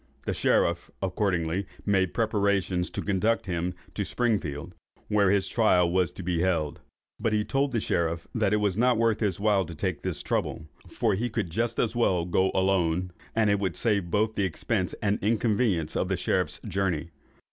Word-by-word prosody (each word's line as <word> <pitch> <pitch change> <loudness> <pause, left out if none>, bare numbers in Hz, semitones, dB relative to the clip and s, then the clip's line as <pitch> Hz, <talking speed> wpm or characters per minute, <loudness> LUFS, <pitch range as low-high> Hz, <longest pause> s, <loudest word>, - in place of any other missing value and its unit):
The - - -1
sheriff 85 0 +1
accordingly 90 -1 -1 0.2
made 95 -3 +2
preparations 100 -5 +1
to - - -4
conduct 105 +3 +1
him 90 -1 -2 0.2
to 105 - -2
Springfield, 95 -9 -1 0.4
where 100 -2 +3
his 95 -1 +2
trial 90 -7 +3
was 90 -2 +2
to 95 - -8
be 85 -1 0
held; 85 -5 0 0.4
but 110 - 0
he 105 -1 +1
told 135 0 0
the 120 - +1
sheriff 85 -4 -1
that 95 - +1
it 105 - +3
was 105 -3 +1
not 120 +2 +3
worth 115 -1 +2
his 100 -5 0
while 100 -2 +3
to 85 -1 -8
take 90 0 -2
this - - -4
trouble, 80 - -2 0.2
for 115 -3 0
he 115 +6 -1
could 105 -7 -3
just 115 +5 -1
as 115 0 0
well 95 -8 +2
go 95 +2 +2
alone, 90 -2 +1 0.2
and 110 -2 +3
it 100 - +2
would 95 -2 -1
save 100 -6 0
both 110 +4 +1
the 100 - 0
expense 95 +1 -1
and 100 0 +1
inconvenience 105 -6 +1
of - - 0
the - - 0
sheriff's - - 0
journey. 85 -4 -1
95 Hz, 185 wpm, -27 LUFS, 90-110 Hz, 0.4 s, where